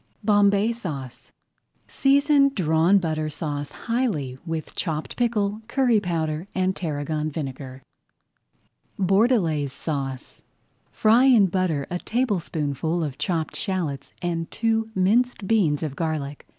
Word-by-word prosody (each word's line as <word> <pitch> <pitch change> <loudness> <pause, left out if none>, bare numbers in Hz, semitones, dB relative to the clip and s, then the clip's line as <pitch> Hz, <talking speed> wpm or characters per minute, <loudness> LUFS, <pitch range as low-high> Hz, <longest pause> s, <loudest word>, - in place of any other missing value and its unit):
BOMBAY 205 +1 +4
SAUCE 150 - -7 0.6
Season 280 +1 +4
Drawn 165 +1 +3
Butter 155 -4 -1
Sauce 145 -1 -4
highly 220 - -2
with 160 -1 -4
chopped 155 -2 -3
pickle, 215 -3 0
curry 245 -3 +3
powder, 165 -2 -2
and 185 0 +1
tarragon 155 -1 -2
vinegar. 135 -3 -6 1.1
BORDELAISE 190 - +2
SAUCE 135 -5 -5 0.5
Fry 230 +4 +4
in 240 -7 +6
butter 175 -6 0
a 180 - -2
tablespoonful 170 - -1
of 145 -4 -5
chopped 165 -5 -2
shallots 155 -8 -3
and 165 -1 -2
two 225 -1 0
minced 220 +4 +2
beans 170 -10 +2
of 145 -3 -4
garlic. 150 -3 -3
175 Hz, 110 wpm, -24 LUFS, 150-215 Hz, 1.1 s, in